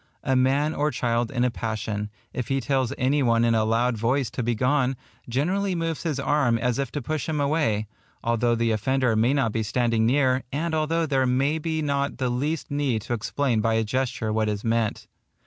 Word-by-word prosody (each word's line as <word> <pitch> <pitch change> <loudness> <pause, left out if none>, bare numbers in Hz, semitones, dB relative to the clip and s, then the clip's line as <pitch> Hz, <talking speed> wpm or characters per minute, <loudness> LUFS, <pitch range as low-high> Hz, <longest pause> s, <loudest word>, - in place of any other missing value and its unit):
A 130 -2 +1
man 135 +4 +2
or 150 +1 +1
child 120 -3 0
in 125 -2 0
a 125 - +2
passion, 110 -2 -3 0.2
if 125 -2 -3
he 135 0 0
tells 130 0 0
any 140 +3 +2
one 115 -2 +3
in 115 - +3
a 110 -1 +3
loud 115 +1 +1
voice 125 +1 0
to 125 - -3
begone, 125 +3 +1 0.3
generally 180 +10 0
moves 165 -2 -2
his 155 -5 -2
arm 140 -4 +2
as 125 +2 -1
if 135 -3 -2
to 145 - -3
push 155 +3 -3
him 155 -2 -1
away, 140 -8 +1 0.4
although 120 0 +2
the 115 0 +1
offender 125 +2 +1
may 120 +6 +3
not 135 -6 +1
be 115 - -1
standing 115 0 +1
near, 130 0 +3
and 160 +4 -2
although 160 +1 +1
there 135 -3 +1
may 135 +5 +1
be 160 0 -2
not 140 -1 -1
the 130 -2 -1
least 145 +6 -2
need 135 -7 0
to - - -3
explain 120 +1 0
by 115 +1 +1
a 110 - +2
gesture 115 -1 -1
what 110 -1 +1
is 105 -1 -3
meant. 115 -2 0
125 Hz, 205 wpm, -25 LUFS, 115-145 Hz, 0.4 s, one